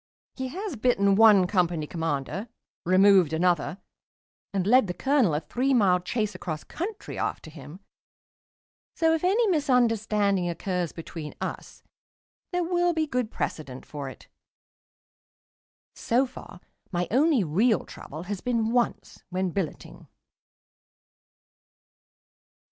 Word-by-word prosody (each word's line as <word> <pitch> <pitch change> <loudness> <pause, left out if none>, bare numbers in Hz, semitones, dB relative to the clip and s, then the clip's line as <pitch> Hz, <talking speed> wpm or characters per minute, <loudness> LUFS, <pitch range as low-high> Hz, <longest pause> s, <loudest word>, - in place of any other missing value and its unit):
He 260 -1 -4
has 370 +5 -5
bitten 210 -4 +2
one 210 -3 +7
Company 175 -4 0
Commander, 165 - -3 0.4
removed 185 -3 +5
another, 175 +1 +1 0.7
and 195 -2 -1
led 245 +1 +5
the 180 - -4
Colonel 265 - +2
a - - +1
three 255 - 0
mile 190 -6 +4
chase 210 +3 -2
across 155 -4 -5
country 390 +5 -6
after 155 - -3
him, 150 +4 -11 1.1
so 325 -1 +3
if 325 - -1
any 410 +6 +3
misunderstanding 220 - +2
occurs 175 0 -2
between 160 -2 -8
us - - -6 0.7
there 355 -1 0
will 350 0 +1
be 320 -1 0
good 250 -6 -2
precedent 135 -10 -5
for 145 -2 -6
it. 130 - -14 1.7
So 250 +4 +1
far 245 -7 -12 0.3
my 175 -1 -1
only 275 -1 +3
real 200 +9 +2
trouble 155 +4 -9
has 195 +1 -5
been 230 -2 0
once 240 0 -1
when 185 0 -1
billeting. 180 -3 -5
200 Hz, 120 wpm, -26 LUFS, 175-255 Hz, 1.7 s, one